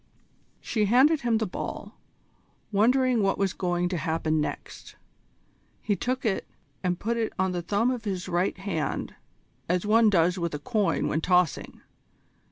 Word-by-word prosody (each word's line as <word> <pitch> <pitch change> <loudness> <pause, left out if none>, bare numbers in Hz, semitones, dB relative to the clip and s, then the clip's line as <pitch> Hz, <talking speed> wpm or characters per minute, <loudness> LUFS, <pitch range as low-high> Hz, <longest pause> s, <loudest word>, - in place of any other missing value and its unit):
She 215 -2 0
handed 270 +8 +4
him 235 -2 +2
the 220 - 0
ball, 185 - -6 0.8
wondering 245 +3 +3
what 195 -1 +1
was 195 -2 0
going 175 -1 -1
to 180 - -2
happen 160 -1 0
next. - - -6 0.8
He 205 - -1
took 255 +4 -2
it 205 -4 -1 0.4
and 180 -1 0
put 235 +2 -1
it 225 -1 -1
on 190 -1 +1
the 175 -1 -2
thumb 210 +8 +1
of 245 -3 -4
his 190 -4 -3
right 180 +2 0
hand 185 -5 -3 0.6
as 180 +2 +1
one 220 +1 +5
does 180 -1 +2
with 170 -3 -2
a - - -5
coin 210 +5 0
when 155 - -1
tossing. 180 0 +1
195 Hz, 160 wpm, -26 LUFS, 175-225 Hz, 0.8 s, one